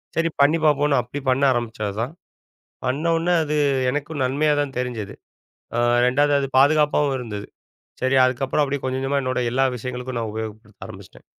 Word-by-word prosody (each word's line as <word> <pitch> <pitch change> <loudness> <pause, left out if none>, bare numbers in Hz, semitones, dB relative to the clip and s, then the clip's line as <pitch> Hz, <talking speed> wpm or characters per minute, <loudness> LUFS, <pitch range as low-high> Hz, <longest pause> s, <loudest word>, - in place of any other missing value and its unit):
சரி 165 0 +1
பண்ணி 150 +4 +4
பாப்போம்னு 145 -2 +3
அப்படி 125 +5 -7
பண்ண 130 +2 +2
ஆரம்பிச்சதுதான். 115 +2 -3 0.7
பண்ணோனா, 165 +6 +1
அது 150 0 -1 0.3
எனக்கும் 150 +1 -3
நன்மையா 145 +4 +1
தான் 135 -3 -4
தெரிஞ்சது. 120 -5 -4 0.6
அ - - 0 0.3
2வது 145 +3 +2
அது 135 - -1
பாதுகாப்பாவும் 145 -1 +3
இருந்தது. 105 -4 -6 0.6
சரி 130 +1 +2
அதுக்கப்புறம் 130 +3 0
அப்படி 140 0 -2
கொஞ்சம் 130 0 -1
கொஞ்சமா 140 +1 0
என்னோட 130 0 -1
எல்லா 135 +1 +2
விஷயங்களுக்கும் 125 +1 -5
நான் 110 -2 -3
உபயோகப்படுத்த 110 -1 -8
ஆரம்பிச்சிட்டேன். - - -13
135 Hz, 150 wpm, -22 LUFS, 125-145 Hz, 0.7 s, பண்ணி